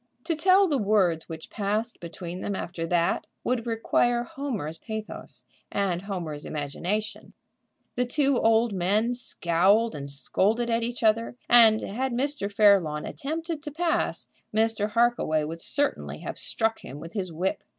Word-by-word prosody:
To 330 - -1
tell 375 +4 +5
the 290 -5 +1
words 195 -6 +2
which 160 -1 -8
passed 215 +3 -2
between 175 +1 -7
them 200 +1 -3
after 170 -2 -4
that 170 0 +1 0.2
would 240 -1 -1
require 240 +1 +1
Homer's 230 - -4
pathos 215 - -6 0.3
and 190 -3 0
Homer's 175 -7 -4
imagination. 180 +9 -3 0.6
The 250 - 0
two 275 +1 +2
old 225 0 +3
men 205 +6 +1
scowled 205 -1 +2
and 140 -1 -6
scolded 215 +11 0
at 230 0 +2
each 240 +1 -3
other, 230 +2 +2
and, 225 -2 +7
had 255 +5 -2
Mr. 265 -4 -1
Fairlawn 195 -8 +4
attempted 320 +2 -4
to 300 - -6
pass, 330 +3 -1 0.3
Mr. 220 -1 +1
Harkaway 230 -10 +2
would 160 +2 -5
certainly 285 0 -1
have - - -5
struck 225 0 -1
him 140 - -9
with 165 +2 -9
his 185 -4 -3
whip. 175 +4 -2
215 Hz, 150 wpm, -26 LUFS, 175-240 Hz, 0.6 s, and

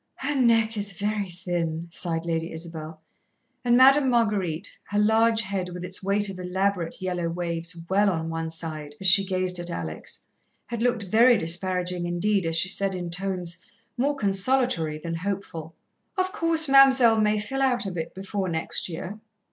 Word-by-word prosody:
"Her 285 +2 -3
neck 230 -4 +2
is 200 -1 -2
very 205 0 -2
thin," 170 -2 -3
sighed 165 -1 -3
Lady 165 0 -2
Isabel, 160 -1 -8 0.6
and 240 -1 +3
Madame 270 +1 +6
Marguerite, 205 -7 -1
her 205 - -4
large 220 +2 +3
head 195 -3 -4
with 180 0 -7
its 185 +1 -6
weight 200 +2 0
of 190 -2 -7
elaborate 185 -1 -2
yellow 180 -2 -2
waves 170 0 -4
well 200 +3 +3
on 160 -3 -2
one 165 0 -4
side 155 -3 -5
as 190 - -3
she 190 +2 +9
gazed 185 -1 -1
at 175 0 -5
Alex, 80 - -6 0.4
had 235 -1 -5
looked 240 -3 +1
very 230 +5 +4
disparaging 180 0 0
indeed 180 +1 0
as 165 - -1
she 165 - +3
said, 195 0 -1
in 175 -1 -5
tones 180 -1 -2 0.4
more 280 +3 0
consolatory 200 - +1
than 165 +2 -6
hopeful: 165 -3 -5 0.4
"Of 370 0 0
course, 330 -5 +4
Mam'selle 265 -5 +6
may 210 0 +2
fill 270 +6 -3
out 250 -4 +1
a 195 - -3
bit 165 -2 -6
before 195 0 -4
next 160 +2 -2
year." 185 +5 -7
190 Hz, 170 wpm, -25 LUFS, 170-220 Hz, 0.6 s, she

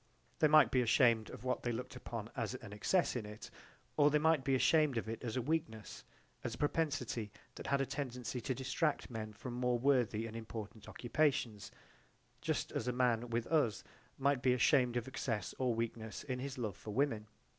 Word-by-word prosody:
They 155 - +6
might 150 -5 +6
be 130 - +4
ashamed 115 -2 +4
of - - -9
what 130 0 -1
they 120 - -1
looked 125 +3 -5
upon 115 -3 -6
as 120 -1 -2
an 115 -5 -9
excess 170 - +1
in 120 - -2
it, 105 +1 -9 0.5
or 145 -1 +6
they 150 - +3
might 155 -2 +3
be 135 +1 +2
ashamed 150 -1 +4
of 115 - -2
it 115 +2 -5
as 115 0 -2
a 125 - 0
weakness, 150 -7 -3 0.4
as 120 -1 -3
a - - -13
propensity 140 -8 -1 0.2
that - - -8
had 140 0 +2
a - - +1
tendency 125 -3 -4
to 130 - -2
distract 135 +2 -1
men 110 -2 -4
from 120 +4 -7
more 125 0 +1
worthy 120 -4 +2
and 115 0 -7
important 110 -2 -7
occupations, 120 -5 0 0.7
just - - -1
as 115 - -3
a - - +2
man 120 -1 +1
with 115 0 -1
us 135 - +1 0.3
might 140 -1 +2
be 125 -1 +4
ashamed 125 -1 +3
of 120 - -2
excess 115 -6 -3
or 125 -3 +1
weakness 115 -1 -4
in 130 -2 -3
his 135 +1 -5
love 110 -6 -3
for - - -10
women. 110 -2 0
125 Hz, 200 wpm, -35 LUFS, 115-135 Hz, 0.7 s, They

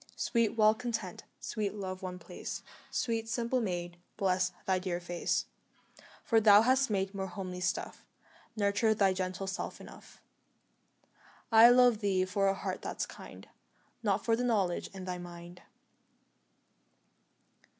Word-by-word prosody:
Sweet 230 -1 0
Well 215 0 +6
content, 225 -5 -5
sweet 210 -2 -3
Love 185 -2 -5
one 185 -1 -5
place, - - -7 0.3
Sweet, 225 -1 -2
simple 240 +1 0
maid, 175 -4 -3 0.2
bless 185 -1 +1
thy 190 -1 +2
dear 180 -1 -3
face; 175 0 -1 0.8
For 225 -2 +3
thou 210 0 +7
hast 260 +2 +3
made 195 -1 -1
more 195 -1 -3
homely 180 0 -6
stuff 175 -1 -3 0.5
Nurture 210 +1 +2
thy 195 -2 +3
gentle 185 0 -3
self 190 0 -5
enough; - - -14 1.3
I 225 +1 +9
love 245 -2 +5
thee 195 -3 +1
for 195 +1 +1
a 195 - +2
heart - - -4
that's - - -3
kind - - -12 0.5
Not - - 0
for 230 - +3
the 245 - -2
knowledge 200 -8 0
in 190 -1 -9
thy 180 -1 -4
mind. 175 0 -10
195 Hz, 140 wpm, -31 LUFS, 185-225 Hz, 1.3 s, I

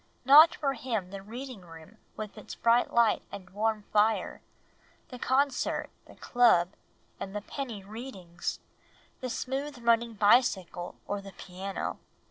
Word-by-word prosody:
Not 300 +5 +9
for 275 -3 -1
him 225 -7 -3
the 195 -1 -7
reading 240 +2 -8
room 165 +4 -14 0.2
with 215 -1 -6
its - - -9
bright 235 +1 +3
light 235 -2 +3
and 190 -1 -9
warm 215 +1 -1
fire, 215 +1 +2 0.7
the 250 - -9
concert, 270 +1 0 0.2
the - - -15
club, 230 -8 +3 0.5
and 195 +1 -6
the 210 - -2
penny 230 -4 -6
readings, 195 -5 -6 0.6
the 255 - -4
smooth 270 +3 -3
running 235 -1 +2
bicycle 200 -5 +2
or 205 0 -3
the 195 -1 -11
piano. 190 +2 -5
220 Hz, 135 wpm, -29 LUFS, 195-250 Hz, 0.7 s, Not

